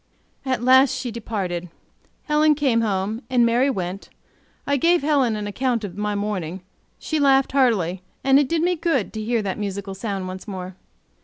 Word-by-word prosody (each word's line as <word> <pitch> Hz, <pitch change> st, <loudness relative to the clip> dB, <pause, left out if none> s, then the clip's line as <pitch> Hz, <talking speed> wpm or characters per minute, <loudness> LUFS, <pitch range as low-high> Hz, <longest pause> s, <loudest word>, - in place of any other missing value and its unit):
At 255 Hz, -2 st, -1 dB
last 260 Hz, +1 st, +5 dB
she 255 Hz, -2 st, -4 dB
departed. 190 Hz, -6 st, -4 dB, 0.5 s
Helen 300 Hz, 0 st, +3 dB
came 265 Hz, -6 st, +2 dB
home, 210 Hz, +1 st, -1 dB
and 245 Hz, -2 st, +4 dB
Mary 240 Hz, +4 st, +3 dB
went. 190 Hz, -4 st, -4 dB, 0.6 s
I 285 Hz, -, +1 dB
gave 335 Hz, +3 st, +3 dB
Helen 275 Hz, -7 st, +2 dB
an 210 Hz, -1 st, -4 dB
account 235 Hz, +2 st, -1 dB
of 185 Hz, -4 st, -6 dB
my 210 Hz, 0 st, -2 dB
morning; 190 Hz, -4 st, -3 dB, 0.4 s
she 315 Hz, -, -2 dB
laughed 270 Hz, -2 st, +4 dB
heartily, 205 Hz, -10 st, +1 dB, 0.2 s
and 270 Hz, +1 st, +5 dB
it 285 Hz, -3 st, +1 dB
did 330 Hz, -1 st, +1 dB
me 360 Hz, +1 st, +2 dB
good 320 Hz, -, -1 dB
to 220 Hz, -, -4 dB
hear 230 Hz, 0 st, 0 dB
that 195 Hz, 0 st, -3 dB
musical 200 Hz, -1 st, -4 dB
sound 195 Hz, -1 st, -4 dB
once 185 Hz, +3 st, -8 dB
more. 185 Hz, -2 st, -6 dB
230 Hz, 175 wpm, -22 LUFS, 195-270 Hz, 0.6 s, last